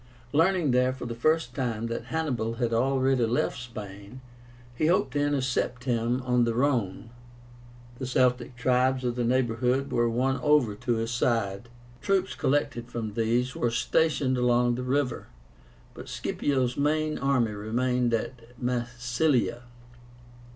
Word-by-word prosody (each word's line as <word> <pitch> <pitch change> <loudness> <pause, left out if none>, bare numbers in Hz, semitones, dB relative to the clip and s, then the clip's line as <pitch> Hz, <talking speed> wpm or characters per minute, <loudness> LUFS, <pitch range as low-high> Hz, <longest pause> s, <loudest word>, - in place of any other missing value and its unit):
Learning 165 -1 +3
there 125 +1 +3
for 130 - -7
the 120 - -4
first 155 +2 +1
time 115 -5 -2
that 115 0 -4
Hannibal 125 -8 -2
had 115 -1 -1
already 130 +1 +2
left 120 +2 0
Spain, 105 -1 -9 0.6
he 155 - +1
hoped 150 -7 +2
to 145 - 0
intercept 130 -3 0
him 120 0 0
on 125 -1 +2
the 115 -1 0
Rhone. 120 -5 0 0.9
The 130 - -3
Celtic 125 -1 +1
tribes 130 +1 +1
of 120 -1 -1
the 125 - -1
neighborhood 125 +2 +1
were 120 0 +2
won 130 +3 0
over 150 -7 +3
to 120 +3 -1
his 115 +1 -2
side. 115 -3 -1 0.3
Troops 190 -1 +1
collected 130 -4 -1
from 110 -3 -4
these 120 +3 0
were 120 - 0
stationed 135 +1 +1
along 120 0 +3
the 125 - -3
river, 130 0 -1 0.7
but - - -10
Scipio's 130 -4 -1
main 155 +2 0
army 130 -5 +1
remained 120 +4 0
at 120 +1 -4
Massilia. 125 +1 0
125 Hz, 140 wpm, -27 LUFS, 120-135 Hz, 0.9 s, Learning